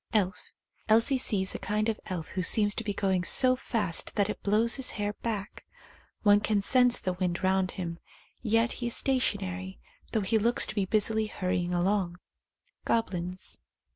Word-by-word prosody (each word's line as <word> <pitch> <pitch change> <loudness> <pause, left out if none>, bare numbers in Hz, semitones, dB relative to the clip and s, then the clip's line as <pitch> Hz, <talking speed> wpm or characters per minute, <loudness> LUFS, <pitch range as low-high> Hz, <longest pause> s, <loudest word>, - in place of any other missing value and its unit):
Elf. 190 -4 -1 0.4
Elsie 230 +5 +4
sees 195 -6 +1
a - - -5
kind 215 +1 -1
of 220 -1 -2
elf 180 -5 -5
who 185 - -3
seems 205 +3 +3
to 225 - -4
be 210 - -2
going 190 -2 0
so 255 +8 +5
fast 215 -9 -3
that 205 0 +1
it - - -9
blows 220 +4 +2
his 265 - +1
hair 205 0 -2
back; 210 -3 -4 0.6
one 205 -1 +6
can 210 0 0
sense 250 +1 +4
the 185 - -2
wind 180 0 -3
round 190 0 +2
him, 170 -2 -5 0.4
yet 225 0 +1
he 240 - -4
is 235 - +1
stationary, 190 -8 -1 0.3
though 220 - 0
he 210 +3 +1
looks 235 +3 +3
to - - -5
be 200 -3 0
busily 215 +2 +1
hur 185 -3 -4
rying 175 0 -1
along. 180 0 0 0.7
Goblins. 185 -5 -3
205 Hz, 175 wpm, -28 LUFS, 185-225 Hz, 0.7 s, one